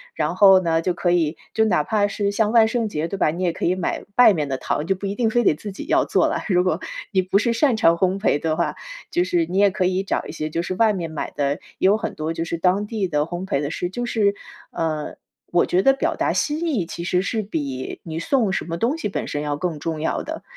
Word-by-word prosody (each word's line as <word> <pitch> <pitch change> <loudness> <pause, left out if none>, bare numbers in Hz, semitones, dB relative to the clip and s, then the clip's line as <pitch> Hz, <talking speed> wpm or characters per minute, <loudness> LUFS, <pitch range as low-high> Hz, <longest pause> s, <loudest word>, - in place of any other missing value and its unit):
然 - - -1
后 195 -2 +7
呢， 165 -2 +1
就 180 +2 0
可 175 0 0
以 165 -3 +1 0.2
就 220 - +3
哪 180 -8 +2
怕 205 -2 +1
是 200 0 -1
像 210 +1 +1
万 225 -1 +6
圣 225 -1 -1
节 160 -4 -2
对 195 - -5
吧？ 155 - +2
你 175 +4 -4
也 175 -2 +1
可 - - -7
以 175 - +3
买 185 - -3
外 245 -4 +8
面 150 -5 -2
的 130 - -1
糖， 150 +3 -2
就 195 - +1
不 190 - -7
一 200 +1 -2
定 230 0 +1
非 240 +2 +2
得 - - +5
自 205 +7 -7
己 195 - -8
要 - - +3
做 - - +2
了。 - - -2
如 180 -1 +3
果 180 -2 0 0.3
你 190 - +3
不 185 +2 +1
是 235 +2 +1
擅 245 -1 +2
长 165 -5 +4
烘 185 +2 0
焙 195 -7 +2
的 160 +1 -1
话， 170 - -1 0.3
就 175 - +1
是 175 -2 +1
你 180 +3 -4
也 205 - +6
可 190 -1 -1
以 185 +1 0
找 195 - -2
一 - - -7
些 155 -1 -4
就 165 +2 -2
是 185 +1 -4
外 220 +2 +3
面 170 -4 -4
买 155 - -5
的， 140 -1 +1 0.3
也 190 - +4
有 205 +2 +4
很 - - -4
多 155 +1 -3
就 165 0 -3
是 170 - -3
当 185 +4 +1
地 210 -3 -2
的 150 -4 0
烘 175 +4 -4
焙 140 - 0
的 145 - -3
是 175 - -3
就 245 +6 -4
是， 205 -4 +1 0.4
呃， 155 -2 -3 0.4
我 175 - +3
觉 180 - +2
得 270 +6 +5
表 270 - -1
达 - - 0
心 305 +3 -1
意 235 - 0
其 170 - -7
实 180 0 +1
是 220 +3 -1
比 140 -10 -4
你 160 -1 -5
送 225 +2 +1
什 - - -2
么 165 0 -4
东 245 - 0
西 300 - -2
本 - - -4
身 145 - -3
要 145 -1 -2
更 160 -1 -3
重 160 0 -3
要 160 - -1
的。 - - -6
185 Hz, 300 characters per minute, -22 LUFS, 165-210 Hz, 0.4 s, 外